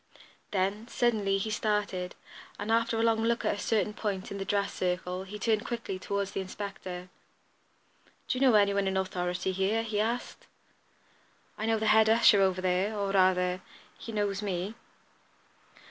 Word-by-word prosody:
Then, 200 +3 -1
suddenly, 215 -5 +1
he 215 +3 -2
started, 205 -4 -1 0.4
and, 210 +2 -3
after 230 0 +2
a - - +2
long 225 -1 +3
look 235 +1 +1
at - - +2
a 205 - -6
certain 210 -1 0
point 200 -3 -3
in 200 - -5
the 195 - -3
dress 200 0 0
circle, 180 +1 -2
he 205 +2 -7
turned 215 0 +1
quickly 230 -6 -4
toward 200 +1 -2
the - - -3
inspector. 185 -2 -6 1.2
"Do 255 - -1
you - - -6
know 260 -4 +6
any 200 -1 +5
one 200 -1 +1
in 190 0 0
authority 180 -1 -1
here?" 195 +4 0
he 215 -2 -2
asked. 235 +3 -2 1.1
"I 220 - -3
know 225 0 +3
the 220 - -2
head 220 0 +5
usher 220 -3 +6
over 185 -1 +2
there; 185 +4 0
or, 200 -1 -1
rather, 185 -1 +3 0.3
he 230 - -8
knows 205 -2 -1
me." 195 0 -2
200 Hz, 170 wpm, -29 LUFS, 190-220 Hz, 1.2 s, know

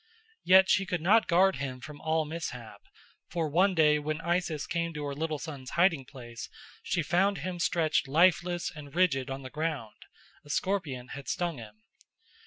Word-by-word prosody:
Yet 190 +1 +7
she 195 0 +2
could 180 -3 -1
not 220 +6 +4
guard 185 -1 +4
him 130 -1 -4
from 150 +2 -10
all 160 0 0
mishap; 130 -8 -7 0.5
for 165 -2 -1
one 185 +6 +3
day 150 -2 +4
when 155 +1 -3
Isis 170 -3 -1
came 170 -1 -2
to 150 - -4
her 140 -1 -3
little 155 +1 -2
son's 140 -4 -8
hiding 170 -6 +3
place 120 -3 -9 0.3
she 175 -3 -1
found 190 +6 +2
him 175 +3 -5
stretched 160 -4 +1
lifeless 175 +3 +2
and 145 -1 -11
rigid 145 -8 +2
on 135 0 -5
the 130 - -8
ground: 150 -8 -4 0.4
a 145 - -17
scorpion 145 -8 -2
had 140 0 -8
stung 170 -6 -2
him. 110 -1 -13
160 Hz, 175 wpm, -29 LUFS, 140-175 Hz, 0.5 s, Yet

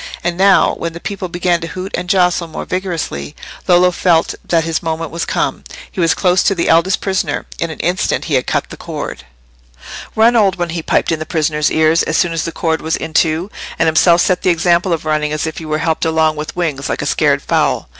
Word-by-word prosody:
And 175 0 -1
now, 195 +1 +4
when 165 -1 -3
the 170 - -8
people 195 +1 -5
began 175 0 0
to 165 - -4
hoot 185 +3 -7
and 180 - -4
jostle 180 -3 +2
more 160 - -6
vigorously, 170 - -4 0.3
Lollo 180 0 +5
felt 170 -2 +2
that 165 -1 +1
his 165 0 -2
moment 165 -1 -3
was 170 0 -3
come—he - - -4
was 165 -2 +3
close 180 -1 +2
to 195 - +2
the 170 - 0
eldest 170 +4 +3
prisoner: 190 -1 -1
in 170 - -1
an 160 - -8
instant 180 +3 0
he 155 - -3
had 130 -2 +1
cut - - -1
the - - -8
cord. - - -6 0.9
"Run, 230 +2 +4
old 200 -5 +3
one!" 175 -1 -2
he 165 0 -3
piped - - 0
in 165 - -1
the 155 - -4
prisoner's 150 -2 0
ear, 160 0 +3
as 160 -1 +1
soon 175 -2 +1
as 165 - -2
the 165 - -3
cord 160 -1 -1
was 160 +1 -1
in 160 - -6
two; 165 +5 +1 0.3
and - - +2
himself 170 +2 +4
set 185 - +1
the - - +1
example 175 +1 +2
of 165 -1 -1
running 150 -1 0
as 155 0 -2
if 160 - -5
he 160 - -8
were 155 0 -1
helped 160 0 -1
along 160 -1 +2
with 150 +1 -6
wings, 155 -6 -2
like - - -2
a - - -3
scared - - +1
fowl. - - 0
170 Hz, 230 wpm, -16 LUFS, 160-180 Hz, 0.9 s, Lollo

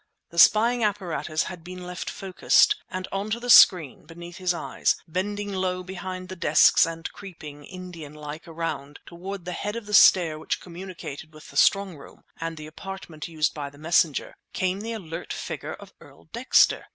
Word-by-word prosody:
The 170 - -2
spying 235 +5 +5
apparatus 170 -7 -1
had 180 -3 -8
been 180 +1 -9
left 180 -1 -5
focussed, 195 - +3
and 185 0 -5
on 195 +2 -3
to 225 +2 -1
the 245 0 0
screen 165 - +6
beneath 170 +1 -10
his 185 -2 0
eyes, 170 - 0
bending 205 +4 -3
low 185 -1 -1
behind 185 0 -6
the 185 - -7
desks 165 -2 +5
and 165 0 -5
creeping, 150 -7 -10
Indian 180 -5 -9
like, 150 +2 -8
around, 160 -3 -5
toward 185 +2 -8
the 180 - -4
head 205 +4 -4
of 235 -2 -6
the 210 - -8
stair 170 -5 +6
which - - -2
communicated 170 -4 -9
with 155 - -13
the - - -17
strongroom 195 -7 +1
and 165 0 -5
the 155 - -8
apartment 160 0 -8
used 160 -2 0
by 145 -2 -5
the 140 - -18
messenger, 160 -1 +1 0.2
came 185 +1 -1
the 230 +1 -4
alert 175 -5 -7
figure - - -5
of - - -14
Earl - - -17
Dexter! - - +3
180 Hz, 175 wpm, -25 LUFS, 160-190 Hz, 0.2 s, screen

